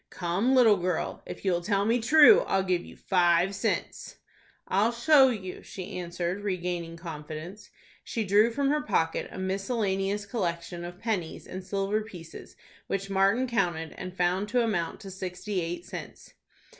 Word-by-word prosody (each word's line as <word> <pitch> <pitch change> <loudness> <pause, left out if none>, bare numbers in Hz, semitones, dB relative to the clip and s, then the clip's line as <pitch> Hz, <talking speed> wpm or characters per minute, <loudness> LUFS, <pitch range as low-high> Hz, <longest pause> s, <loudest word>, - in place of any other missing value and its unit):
"Come, 190 +9 0
little 225 -5 +6
girl, 180 -1 -2
if - - -8
you'll 175 -2 +2
tell 200 +2 +1
me 230 +3 +2
true, 310 - +8
I'll 190 0 +2
give 180 -2 0
you - - -13
five 175 0 +2
cents." 200 - -3 0.5
"I'll 205 +5 +2
show 265 +3 +5
you," 190 -6 -5
she 185 -1 -7
answered, 175 +2 -3
regaining 175 -4 -3
confidence. 165 +4 -8 0.3
She 225 - -2
drew 210 +3 +4
from 275 +4 0
her 300 0 +1
pocket 165 - 0
a - - -9
miscellaneous 195 +1 -1
collection 175 -4 -3
of 175 0 -7
pennies 200 -8 -3
and 185 0 -7
silver 195 +2 -1
pieces, 180 -7 -11 0.3
which 195 0 -3
Martin 195 +6 +3
counted, 175 -10 -1
and 185 0 -8
found 180 +3 +1
to 245 +1 +2
amount 175 -7 -2
to 195 -2 -8
sixty 185 +1 -4
eight 175 +1 -4
cents. - - -9
190 Hz, 155 wpm, -28 LUFS, 175-215 Hz, 0.5 s, true